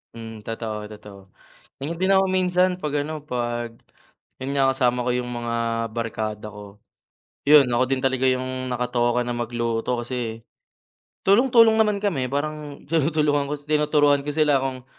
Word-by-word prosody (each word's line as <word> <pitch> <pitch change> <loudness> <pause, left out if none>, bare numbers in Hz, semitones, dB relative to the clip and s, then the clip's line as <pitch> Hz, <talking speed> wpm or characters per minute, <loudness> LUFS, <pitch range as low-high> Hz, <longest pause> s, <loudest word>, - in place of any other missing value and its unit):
Hmm, 115 -1 -8
totoo 115 -1 -4 0.2
totoo. 105 -1 -12 0.6
Ganyan 165 +5 -5
din 190 - +2
ako 190 0 +4
minsan 185 -1 +2
'pag 150 -1 -2
ano, 155 -1 -6
'pag 120 -4 -3 0.7
yun 135 +2 -3
nga, 135 -1 +4
kasama 125 -2 +1
ko 125 - 0
yung 125 0 -2
mga 120 0 -3 0.4
barkada 110 -2 -4
ko. 105 0 -12 0.7
Yun, 150 -2 +8
ako 120 +2 +3
din 135 -1 -1
talaga 130 0 +1
yung 130 0 -1
nakatoka 125 -1 0
na 120 - -2
magluto 120 0 -2
kasi 115 -2 -4 0.8
tulong-tulong 230 +2 +6
naman 210 -2 +2
kami. 135 -11 0
Parang 150 0 -4
tinutulungan 150 -2 +1
ko - - 0
si 145 - -24
tinuturuan 150 -1 +3
ko 150 - -4
sila 145 -2 +2
kung 130 -1 -4
130 Hz, 150 wpm, -23 LUFS, 120-150 Hz, 0.8 s, Yun